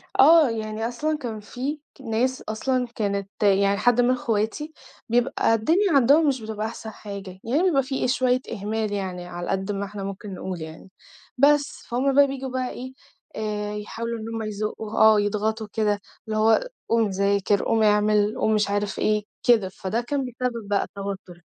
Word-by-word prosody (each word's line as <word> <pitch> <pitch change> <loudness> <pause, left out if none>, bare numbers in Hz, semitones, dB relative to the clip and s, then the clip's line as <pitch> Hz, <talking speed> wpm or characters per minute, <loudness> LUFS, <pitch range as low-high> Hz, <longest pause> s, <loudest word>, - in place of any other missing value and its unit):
آه، 310 +1 +7
يعني 220 0 -3
أصلًا 300 +6 -1
كان 235 -7 -5
في 255 +8 -4 0.2
ك - - -16
ناس 255 +2 -1
أصلًا 250 +3 0
كانت 200 -2 -2
يعني 200 0 +4
حد 245 +3 +3
من 245 +1 +3
إخواتي 245 +5 -1 0.4
بيبقى 240 -1 +2
الدنيا 335 - +2
عَندهم 280 +4 +5
مش 265 -4 +1
بتبقى 215 -1 -4
أحسن 225 -1 -7
حاجة، 200 -3 -8
يعني 275 +9 +1
بيبقى 305 -8 +3
في 265 0 -1
شوية 255 0 +2
إهمال 215 +1 -2
يعني، 185 -3 -4
على 175 0 -6
قد 195 +1 -1
ما 200 0 -2
إحنا 200 0 -7
ممكن 195 +1 -6
نقول 185 -2 -5
يعني، 160 +4 -10 0.5
بس، 285 +2 +3
فهُم 260 +3 +1
بقى 285 0 +7
بييجوا 270 -1 -5
بقى 255 0 -2
إيه، 260 +1 -8 0.4
آآ 210 -1 -3
يحاولوا 230 +2 -4
إن 220 - -7
هُم 225 - -3
يزقُّوا، 215 +1 -4
آه 220 -1 +7
يضغطوا 215 +1 -1
كده 210 -2 +1 0.3
اللي 215 0 -2
هو 225 - +3 0.2
قوم 230 -2 +3
ذاكر، 200 +1 +1
قوم 225 -1 +2
اعمِل، 210 0 +3
قوم 220 - +2
مش 210 -1 +1
عارف 205 0 -1
إيه، 210 0 +1 0.2
كده، 220 -6 +4
فده 190 +4 -3
كان 270 +2 -2
بيسبِّب 245 -3 -4
بقى 200 -1 +1
التوتُّر. 195 -3 -7
220 Hz, 175 wpm, -24 LUFS, 205-255 Hz, 0.5 s, آه